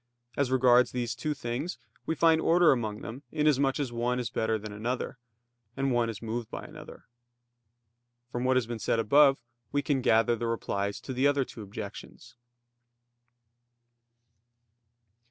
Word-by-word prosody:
As 140 -3 +1
regards 125 -1 +5
these 120 -3 -2
two 150 +6 -3
things 125 +5 -4 0.3
we 160 - 0
find 160 -1 +4
order 170 0 +5
among 110 -5 -1
them, 120 +4 -7
inasmuch 140 -3 +2
as 135 -4 -2
one 120 +1 0
is 120 -1 -3
better 110 -1 0
than 105 0 -8
another; 120 +4 -3 0.6
and 135 0 0
one 120 -2 +1
is 110 -1 -7
moved 115 0 -4
by - - -6
another. - - -12 1.3
From 120 - -3
what 130 0 +3
has 125 - +1
been 115 0 -5
said 115 - 0
above, 135 +5 +5 0.3
we 145 0 0
can 140 -2 0
gather 115 0 +3
the 115 +1 -3
replies 100 -3 -2
to 130 - -6
the 130 +3 +3
other 140 -2 +2
two 115 - -10
objections. 100 -1 -9
125 Hz, 155 wpm, -29 LUFS, 115-135 Hz, 1.3 s, regards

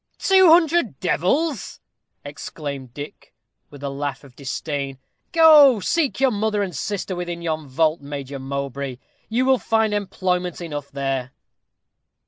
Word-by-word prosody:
"Two 380 -2 +5
hundred 325 - +4
devils!" 275 - 0 0.5
exclaimed 145 -2 -7
Dick, 145 +4 -10 0.3
with 145 -1 -13
a 140 - -2
laugh 140 +1 -4
of 135 -3 -16
disdain. 140 0 -4 0.3
"Go, 305 - +7
seek 295 - 0
your 265 -1 +3
mother 210 -1 0
and 185 -5 -5
sister 190 +5 -3
within 175 -1 -5
yon 155 -2 -3
vault, 155 +4 +1
Major 140 -1 -6
Mowbray; 140 -1 -4 0.3
you 240 +3 +1
will 265 -1 +4
find 220 -2 +1
employment 185 -3 -1
enough 145 -5 -6
there." 135 -2 -3
170 Hz, 130 wpm, -22 LUFS, 140-225 Hz, 0.5 s, Go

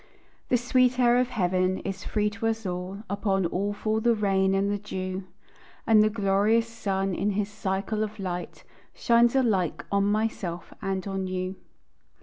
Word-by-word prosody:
The 250 - +4
sweet 250 +1 +2
air 240 -1 +5
of 250 0 +1
heaven 185 -4 +1
is 195 0 -5
free 210 -1 0
to 225 +1 -3
us 225 -1 -2
all; 185 +3 -4
Upon 195 -1 0
all 195 +4 -1
fall 215 +1 -1
the 235 0 +3
rain 195 -2 +2
and 200 +1 +1
the 205 - -1
dew; 185 -2 -5 0.6
And 220 -1 +6
the 215 - +4
glorious 210 +2 +2
sun 195 -4 -2
in 200 +3 0
his 205 0 -1
cycle 205 +1 -2
of 215 0 -5
light 180 -3 -5 0.3
Shines 235 +1 +3
alike 210 -10 +1
on 200 0 +2
myself 205 -5 -2
and 195 -1 -2
on 195 -1 -2
you. 185 0 -3
200 Hz, 165 wpm, -27 LUFS, 190-220 Hz, 0.6 s, And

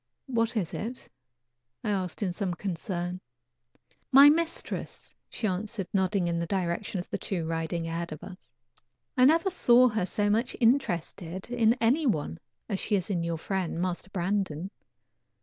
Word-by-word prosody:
"What 230 -2 0
is 185 -6 -1
it?" 240 +4 -5 0.8
I 215 - 0
asked 190 0 -2
in 185 -3 -1
some 180 -1 -2
concern. 180 -1 -3 0.9
"My 280 +2 +10
mistress," 335 +2 -3 0.2
she 230 - -4
answered, 200 +1 -2
nodding 190 -1 +1
in 170 0 0
the 170 - -2
direction 185 +1 -1
of 175 - -6
the - - -2
two 175 -5 -2
riding 165 +1 -2
ahead 170 +1 -3
of 155 - -8
us. 185 -8 -11 0.7
"I 255 - +6
never 330 +6 +4
saw 250 -7 +5
her 215 -5 -1
so 205 +1 0
much 225 +4 +1
interested 190 - 0
in 235 -1 +4
any 255 +6 +2
one 145 - -1 0.3
as 200 -4 -2
she 210 - +1
is 190 +1 -1
in 175 -3 0
your 170 -1 -2
friend, 180 -1 -2
Master 180 +1 -2
Brandon. 190 -2 -2
195 Hz, 160 wpm, -28 LUFS, 175-230 Hz, 0.9 s, My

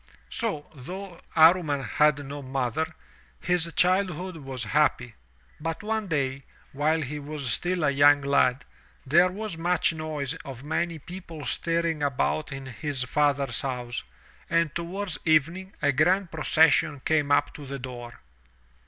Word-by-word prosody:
So, 200 -11 -1
though 180 +6 -8 0.2
Amman 160 -4 +5
had 150 +4 +2
no 145 +1 -6
mother, 135 +3 -2 0.5
his 175 -1 0
childhood 185 -1 +1
was 135 -4 -4
happy. 125 0 +1 0.5
But 165 +4 -4
one 220 -1 -1
day, 135 -5 -1 0.3
while 155 +3 +1
he 150 +2 -5
was 145 -3 -4
still 180 +3 0
a 140 - +3
young 145 +1 +5
lad, 140 -1 +2 0.4
there 170 +7 +5
was 200 -2 -5
much 175 0 +2
noise 155 -4 -3
of 135 -1 -9
many 165 +2 -1
people 170 -2 -9
stirring 165 +4 0
about 145 +2 0
in 135 0 -6
his 130 +1 -3
father's 140 -2 +1
house, 125 - -3 0.5
and 165 -3 +2
to 170 - -3
ward*s 180 -3 -4
evening 165 +5 +1
a 145 - +4
grand 175 +6 +2
procession 155 -2 +3
came 150 -1 +1
up 145 - +3
to 145 -2 -10
the 140 +1 -5
door. 120 -2 -8
150 Hz, 145 wpm, -26 LUFS, 140-170 Hz, 0.5 s, Amman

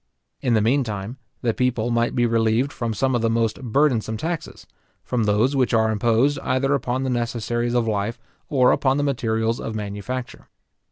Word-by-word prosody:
In 120 -2 +2
the 110 - +3
meantime, 115 -2 -1 0.3
the 115 -2 +1
people 120 -2 0
might 115 0 +1
be 120 - +3
relieved 115 +3 +1
from 115 -1 -3
some 130 +4 0
of 120 - +1
the 115 - +2
most 115 0 0
burdensome 120 -3 +1
taxes; 165 +6 -5 0.4
from 120 -3 -1
those 110 +7 +2
which 130 -3 +2
are 110 0 +3
imposed 115 +6 +2
either 135 +2 0
upon 130 -1 -1
the 130 - -1
necessaries 120 0 -1
of 120 -2 +1
life, 105 +1 -1 0.3
or 130 -3 +4
upon 135 0 +2
the 145 - +1
materials 115 -4 0
of 110 - -5
manufacture. 105 +5 -5
120 Hz, 175 wpm, -23 LUFS, 110-130 Hz, 0.4 s, or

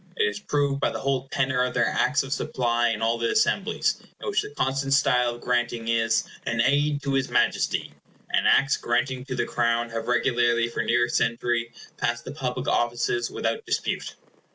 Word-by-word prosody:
It - - +3
is 105 0 -1
proved 140 +3 0
by - - +2
the - - -4
whole 135 -1 -1
tenor 130 -1 +1
of 125 - -2
their 120 -2 +3
Acts 150 -2 +1
of 135 0 -3
Supply 120 -4 0
in 110 -1 -2
all 115 +1 +1
the 115 0 0
Assemblies, 205 -3 +1 0.2
in - - -7
which 410 0 +1
the 420 - -7
constant 135 - -1
style 125 -3 +3
of 120 - -13
granting 120 -2 -1
is, 115 -1 +2 0.2
"an 115 -1 -2
aid 145 +4 +2
to 140 -1 -1
his 135 -1 0
Majesty", - - 0 0.4
and - - +2
Acts 135 +1 +4
granting 125 +2 -1
to 130 -2 -4
the - - 0
Crown 115 -1 0
have 115 0 -4
regularly 120 -1 +2
for - - -2
near 120 +1 +2
a - - -5
century 115 0 0 0.3
passed 120 0 -1
the - - -6
public 130 -4 -4
offices 120 0 0
without 115 0 -2
dispute. - - -2
120 Hz, 195 wpm, -25 LUFS, 115-135 Hz, 0.4 s, Acts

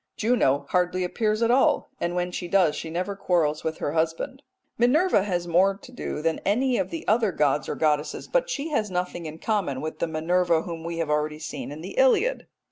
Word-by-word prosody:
Juno 175 - +2
hardly 180 0 +1
appears 215 +4 0
at 230 - +3
all, 260 +2 +3
and 175 +1 -2
when 180 0 -1
she 175 - -4
does 175 -4 +3
she 160 - -5
never 185 +5 -3
quarrels 165 -6 0
with 160 0 -2
her - - -2
husband. 165 - -1 0.3
Minerva 270 - +3
has 175 -3 -2
more 190 +3 +3
to 250 - -14
do 155 -10 -5
than 165 -1 0
any 245 +5 +1
of - - -1
the 330 -1 -6
other 220 -1 +3
gods 150 -2 +1
or - - -2
goddesses, 150 -1 0
but - - +1
she 310 - -3
has 220 -8 0
nothing 180 -2 -3
in 155 +1 -8
common 180 -9 -1
with 155 +2 -5
the 170 - 0
Minerva 165 +1 +1
whom 165 -2 -6
we 170 0 -4
have 165 -2 -1
already 150 0 0
seen 155 -2 -6
in 150 +2 -8
the 170 - -8
Iliad. - - +3
180 Hz, 210 wpm, -25 LUFS, 160-220 Hz, 0.3 s, at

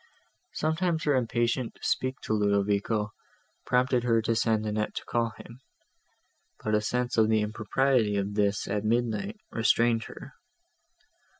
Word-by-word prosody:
Sometimes 160 +1 0
her 145 - +2
impatience 120 0 0
to - - -21
speak 130 +1 -1
to - - -2
Ludovico 105 +1 +1 0.6
prompted 125 0 +2
her 115 -2 +3
to 115 +1 +1
send 110 -1 +1
Annette 105 0 -2
to - - -5
call 115 -1 -1
him; 120 +1 -12 1.0
but 110 - -1
a 105 - +3
sense 125 +2 -1
of 110 0 +4
the 110 -1 +3
impropriety 110 +1 +1
of 100 +1 -2
this 100 -1 0
at 105 +1 -1
midnight 120 - -1
restrained 115 0 +2
her. - - -11
115 Hz, 140 wpm, -28 LUFS, 105-125 Hz, 1.0 s, of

